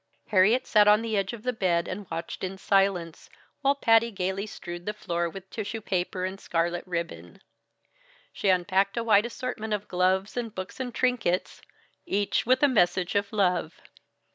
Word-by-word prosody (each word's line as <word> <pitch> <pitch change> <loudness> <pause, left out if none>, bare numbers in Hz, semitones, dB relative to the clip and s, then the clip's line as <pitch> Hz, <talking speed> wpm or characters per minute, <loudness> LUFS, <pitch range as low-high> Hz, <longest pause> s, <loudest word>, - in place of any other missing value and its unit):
Harriet 215 +5 +4
sat 210 -1 +5
on 210 +2 +5
the 225 -1 -2
edge 195 -2 0
of 230 -3 -9
the 250 - 0
bed 175 -6 +1
and 200 +1 -6
watched 165 +3 -5
in 190 +1 -4
silence, 190 -4 0 0.3
while 280 0 +3
Patty 230 -3 +4
gaily 195 0 -3
strewed 175 -3 -8
the 210 - -2
floor 170 -4 -2
with 190 +2 -10
tissue 220 0 -4
paper 185 -2 -2
and 190 +1 -5
scarlet 170 +1 -1
ribbon. 170 -1 -5 0.9
She 200 - 0
unpacked 190 +3 +2
a 235 - 0
wide 220 0 +4
assortment 230 -3 -4
of 210 0 -3
gloves 185 +2 +1
and 230 -3 -4
books 185 +5 -7
and 255 -1 -3
trinkets, 235 -8 0 0.5
each 205 +3 0
with 255 +2 +3
a - - +8
message 180 -7 +2
of 200 0 0
love. 180 -5 +1
195 Hz, 170 wpm, -27 LUFS, 180-220 Hz, 0.9 s, a